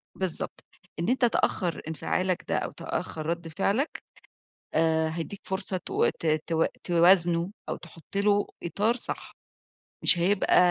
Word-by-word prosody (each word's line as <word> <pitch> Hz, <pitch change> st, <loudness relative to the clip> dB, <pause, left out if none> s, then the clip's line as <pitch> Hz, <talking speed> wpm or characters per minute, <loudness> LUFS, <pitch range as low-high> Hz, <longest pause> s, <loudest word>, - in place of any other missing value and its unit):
بالضبط، 185 Hz, -4 st, -3 dB, 0.4 s
إن 170 Hz, -, 0 dB
أنت 255 Hz, 0 st, +3 dB
تأخر 185 Hz, -6 st, 0 dB
إنفعالك 180 Hz, +3 st, -1 dB
ده، -, -, +1 dB
أو -, -, -2 dB
تأخر 155 Hz, -1 st, -4 dB
رَدّ 170 Hz, +1 st, -2 dB
فعلك، 200 Hz, -, -1 dB, 0.7 s
آآ، 160 Hz, 0 st, +2 dB
هيدّيك 170 Hz, +5 st, -5 dB
فرصة 190 Hz, 0 st, -2 dB
تو 180 Hz, -, 0 dB
ت -, -, -4 dB
ت 160 Hz, +1 st, +1 dB, 0.2 s
توازنه 175 Hz, 0 st, +4 dB, 0.2 s
أو -, -, -2 dB
تحُطّ 165 Hz, +2 st, -13 dB
له 205 Hz, 0 st, +3 dB, 0.2 s
إطار 205 Hz, +8 st, +1 dB
صح، 245 Hz, -, -4 dB, 0.7 s
مش 180 Hz, -, +8 dB
هيبقى 190 Hz, +3 st, +3 dB
175 Hz, 135 wpm, -27 LUFS, 165-200 Hz, 0.7 s, مش